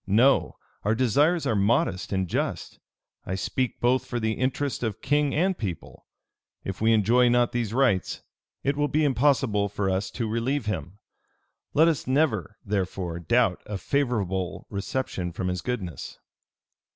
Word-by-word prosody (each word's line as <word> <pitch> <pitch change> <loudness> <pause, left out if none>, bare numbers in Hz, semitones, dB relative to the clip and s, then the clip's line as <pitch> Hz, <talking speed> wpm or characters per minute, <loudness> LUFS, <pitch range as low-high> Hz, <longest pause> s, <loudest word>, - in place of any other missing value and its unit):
No: 120 +8 +3 0.3
our 105 +2 +1
desires 145 - +2
are 110 - +1
modest 100 -2 +1
and 95 -2 0
just. - - -3 0.4
I 95 - -3
speak 125 +5 -2
both 125 +1 +2
for 120 -2 -3
the 110 -1 0
interest 130 +4 -1
of 110 -4 -2
king 145 +1 +1
and 185 +5 +2
people. 95 - -6 0.6
If 95 +1 -5
we 110 +1 +4
enjoy 115 +3 +4
not 120 0 +3
these 120 -3 -2
rights, 120 -7 +1 0.4
it 140 +1 +1
will 145 0 +1
be 155 +1 +1
impossible 130 -7 +2
for 100 -1 -1
us 95 +1 -1
to 115 -2 -1
relieve 115 +4 -1
him. 90 -2 -4 0.8
Let 160 +3 +6
us 160 -6 0
never, 130 - +1
therefore, 95 -4 -2
doubt 115 0 +2
of 105 - -4
a - - -1
favorable 95 -7 -1
reception 100 -3 -3
from 90 +2 -2
his 90 -1 -2
goodness." 95 - -5
115 Hz, 155 wpm, -26 LUFS, 95-130 Hz, 0.8 s, Let